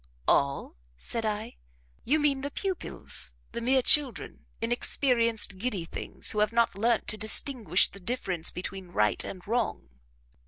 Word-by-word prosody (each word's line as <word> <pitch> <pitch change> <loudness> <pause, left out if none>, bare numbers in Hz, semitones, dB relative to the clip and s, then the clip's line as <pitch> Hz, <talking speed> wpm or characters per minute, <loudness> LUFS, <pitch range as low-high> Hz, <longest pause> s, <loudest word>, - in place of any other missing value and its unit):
"All?" 140 - +1 0.2
said 225 - -2
I; 210 - -4 0.5
"you 290 +6 +2
mean 285 -2 +1
the 285 - -3
pupils 380 +4 -5 0.2
the 235 - -5
mere 260 +2 +2
children 270 -8 +3
inexperienced, 230 -3 +1
giddy 205 -6 -3
things, - - -3
who 215 - -2
have 210 0 +2
not 235 0 +2
learnt 230 +3 +1
to 215 - 0
distinguish 215 - +4
the 200 - -14
difference 185 -5 -2
between 185 +1 -7
right 105 -12 +1
and 185 -2 -8
wrong?" 225 - -2
225 Hz, 145 wpm, -28 LUFS, 190-250 Hz, 0.5 s, distinguish